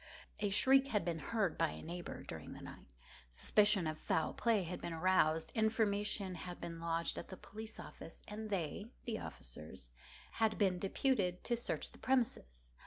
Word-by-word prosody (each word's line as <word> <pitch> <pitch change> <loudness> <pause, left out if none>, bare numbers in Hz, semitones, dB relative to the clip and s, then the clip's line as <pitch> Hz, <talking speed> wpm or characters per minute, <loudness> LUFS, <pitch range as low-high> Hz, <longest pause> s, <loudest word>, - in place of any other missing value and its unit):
A 205 -1 +1
shriek 270 +7 +6
had 210 -7 0
been 170 -2 -1
heard 205 -2 0
by 165 -1 +3
a - - -8
neighbour 175 +2 -6
during - - -7
the - - -10
night; - - -10 0.4
suspicion 205 - +4
of 155 0 -2
foul 160 - 0
play 225 -5 +2
had 180 +1 -5
been 170 - -3
aroused; 160 -2 +3
information 210 -3 +1
had 175 0 -6
been 170 -1 -6
lodged 165 0 -1
at - - -7
the 190 - -8
police 220 +3 -7
office, 165 - -10
and 215 +1 -5
they 195 +1 -2 0.2
(the 225 -2 -2
officers) 65 0 -8 0.5
had 220 -1 +3
been 190 -3 +2
deputed 195 -3 +1
to 240 - +1
search 235 - -2
the - - -16
premises. - - -1
185 Hz, 175 wpm, -37 LUFS, 165-220 Hz, 0.5 s, shriek